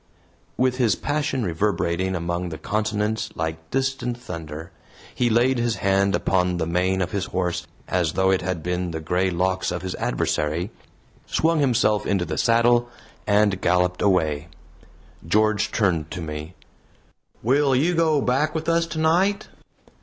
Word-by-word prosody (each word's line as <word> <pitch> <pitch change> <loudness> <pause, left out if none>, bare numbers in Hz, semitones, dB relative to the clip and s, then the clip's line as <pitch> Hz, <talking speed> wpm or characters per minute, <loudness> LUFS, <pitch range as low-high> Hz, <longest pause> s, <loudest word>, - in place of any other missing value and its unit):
With 130 0 +1
his 120 -5 +3
passion 145 -3 -1
reverberating 95 0 0
among 85 +1 -2
the 80 - -6
consonants 105 +3 -1
like 80 0 -4
distant 130 -2 -1
thunder, 80 -6 -8 0.4
he 120 - +1
laid 120 +3 +3
his 120 -1 0
hand 100 0 +2
upon 90 -1 +1
the 80 - -1
mane 90 +3 +1
of 90 - -5
his 100 -2 -1
horse 90 -2 -2 0.2
as 90 -4 0
though 95 0 +2
it 95 - +2
had 90 -3 -3
been 90 +1 -2
the 80 -1 -4
gray 90 +4 0
locks 95 +1 0
of 90 - -4
his 95 -1 -3
adversary, 80 +5 -1 0.6
swung 165 0 +1
himself 115 -6 +2
into 95 -3 +1
the 80 -1 -3
saddle 120 +1 +3 0.4
and 105 -2 +3
galloped 90 0 +1
away. 80 -7 +1 0.8
George 110 +3 +2
turned 85 -7 +1
to 90 - -6
me: 75 +2 -6 0.9
"Will 135 +3 +3
you 160 +7 +2
go 160 -3 +2
back 140 +5 +1
with 160 0 -3
us 165 0 +2
tonight?" 170 +5 +1
95 Hz, 150 wpm, -23 LUFS, 90-125 Hz, 0.9 s, his